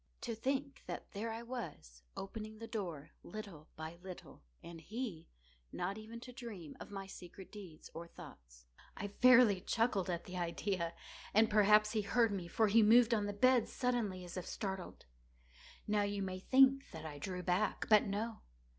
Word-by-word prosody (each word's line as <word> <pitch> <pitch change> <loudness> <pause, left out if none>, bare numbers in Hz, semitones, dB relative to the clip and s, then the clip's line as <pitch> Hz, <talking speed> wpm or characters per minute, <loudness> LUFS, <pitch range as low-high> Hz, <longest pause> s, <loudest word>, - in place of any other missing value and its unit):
To 235 - -3
think 270 +4 -2
that - - -6
there 225 +3 -3
I 225 +1 -5
was, 155 - -7 0.2
opening 215 +2 -6
the 230 - -7
door, 175 -10 -5
little 195 -8 -8
by 160 +2 -7
little, 185 -1 -10 0.2
and 170 -1 -9
he 215 - -5 0.4
not 185 +3 -2
even 225 +2 -8
to 250 0 -9
dream 220 - -8
of - - -9
my 195 -1 -5
secret 190 0 -11
deeds 185 -7 -11
or 170 +1 -7
thoughts. - - -13 0.3
I 205 - -3
fairly 235 -3 +6
chuckled 215 -4 +1
at 170 -1 -2
the 180 0 -7
idea; 170 0 -1 0.4
and 220 +1 +5
perhaps 210 0 +6
he 220 - +1
heard 230 +2 +3
me; 185 -4 -3
for 220 +5 +2
he 220 +3 +6
moved 230 +2 +6
on 210 -2 +1
the - - -1
bed 250 +3 +4
suddenly, 230 -8 -1
as 175 +1 -8
if 180 - -4
startled. 190 -3 -5 0.8
Now 210 0 +2
you 200 -1 -1
may 185 -1 -4
think 270 +5 +5
that 160 -1 -8
I 145 -2 -6
drew 180 +4 -4
back—but 210 +3 +3
no. 215 +3 -3
205 Hz, 170 wpm, -36 LUFS, 180-230 Hz, 0.8 s, fairly